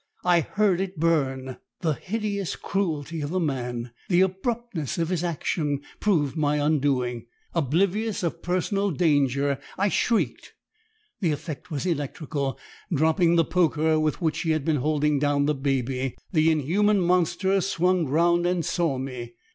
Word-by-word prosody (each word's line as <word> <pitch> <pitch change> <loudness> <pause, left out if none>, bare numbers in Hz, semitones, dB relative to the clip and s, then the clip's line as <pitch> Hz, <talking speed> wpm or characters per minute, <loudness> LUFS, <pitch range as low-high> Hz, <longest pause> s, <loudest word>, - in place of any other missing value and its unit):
I 175 -1 +5
heard 190 +2 +1
it 190 -4 -4
burn! 135 -5 0 0.2
The 160 -3 +1
hideous 200 +2 -3
cruelty 165 -5 -2
of 145 - -3
the 185 +3 0
man, 125 -6 -2 0.2
the 180 -1 +4
abruptness 190 - -2
of 165 -1 0
his 180 -2 -1
action, 150 -3 -1 0.2
proved 160 -10 +1
my 150 -2 +1
undoing. 135 -6 0 0.3
Oblivious 190 - 0
of 170 0 -2
personal 195 +3 0
danger, 140 -4 +2 0.2
I 200 +2 +2
shrieked. 230 +3 0 0.7
The 180 - +1
effect 155 +3 -6
was 150 0 -3
electrical. 145 -4 -2 0.3
Dropping 165 +2 +3
the 165 -1 +4
poker, 160 -2 +2
with 155 +3 -1
which 160 -2 0
he 165 - -2
had 155 -3 +1
been 155 -2 +2
holding 150 +1 +1
down 145 0 +2
the 150 - +2
baby, 135 -2 -1
the 160 -2 +4
inhuman 190 +8 +2
monster 180 +2 +2
swung 180 -2 +1
round 170 +4 +3
and 175 -3 0
saw 170 -5 0
me. 125 -3 -6
160 Hz, 145 wpm, -25 LUFS, 145-180 Hz, 0.7 s, I